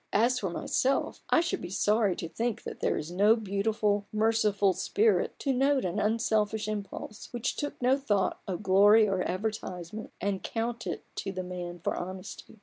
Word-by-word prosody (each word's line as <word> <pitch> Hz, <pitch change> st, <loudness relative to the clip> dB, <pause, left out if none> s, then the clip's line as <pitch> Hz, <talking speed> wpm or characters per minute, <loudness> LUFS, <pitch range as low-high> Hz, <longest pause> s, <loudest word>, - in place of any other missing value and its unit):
As 240 Hz, +4 st, +3 dB
for 195 Hz, -, -2 dB
myself, 260 Hz, +9 st, 0 dB
I -, -, +5 dB
should 345 Hz, -, -2 dB
be 175 Hz, -, -6 dB
sorry 205 Hz, 0 st, +2 dB
to 165 Hz, -, -5 dB
think 225 Hz, +5 st, -2 dB
that -, -, -7 dB
there -, -, +1 dB
is 155 Hz, +3 st, -5 dB
no 205 Hz, +5 st, +5 dB
beautiful, 205 Hz, -1 st, 0 dB
merciful, 215 Hz, -3 st, +2 dB
Spirit 420 Hz, -, +1 dB
to 275 Hz, -, 0 dB
note 270 Hz, -1 st, +2 dB
an 180 Hz, +3 st, -1 dB
unselfish 215 Hz, 0 st, +1 dB
impulse, 210 Hz, 0 st, -6 dB
which 240 Hz, -1 st, -2 dB
took 290 Hz, -1 st, -4 dB
no 255 Hz, +2 st, +3 dB
thought 205 Hz, -8 st, 0 dB
of 190 Hz, +1 st, -4 dB
glory 205 Hz, +3 st, +6 dB
or 190 Hz, -2 st, 0 dB
advertisement, 185 Hz, 0 st, -4 dB
and 200 Hz, -1 st, -1 dB
count 235 Hz, +1 st, -3 dB
it -, -, -4 dB
to 195 Hz, -, -3 dB
the 185 Hz, -1 st, -4 dB
man 175 Hz, -1 st, -6 dB
for -, -, 0 dB
honesty. 185 Hz, +4 st, -7 dB
210 Hz, 175 wpm, -29 LUFS, 190-225 Hz, -, glory